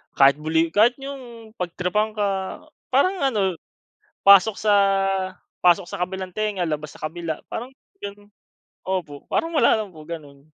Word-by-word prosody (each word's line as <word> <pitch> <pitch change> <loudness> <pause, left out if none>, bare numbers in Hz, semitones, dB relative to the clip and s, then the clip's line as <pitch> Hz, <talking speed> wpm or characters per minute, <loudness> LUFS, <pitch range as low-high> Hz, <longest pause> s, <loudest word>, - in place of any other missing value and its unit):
kahit 140 +1 +5
bully 160 +1 +1
kahit 225 +6 +4
iyong 250 -5 -9
pag-tripan 180 +5 -1
ka. 195 -2 -2 0.2
Parang 370 +9 +2
ano, 205 - 0 0.6
pasok 200 +1 +6
sa 210 -1 +3 0.9
pasok 180 0 +4
sa 200 - -5
kabilang 190 +1 -6
tenga 210 -5 -1
labas 150 -1 -4
sa - - -15
kabila. 165 -1 -5
Parang 245 +3 -6 0.3
ganun 205 0 -8 0.6
opo. 175 -7 -3
Parang 330 0 0
wala 225 - +4
lang 215 - -5
po 155 - -11
ganoon. 145 -4 -9
195 Hz, 140 wpm, -23 LUFS, 165-220 Hz, 0.9 s, pasok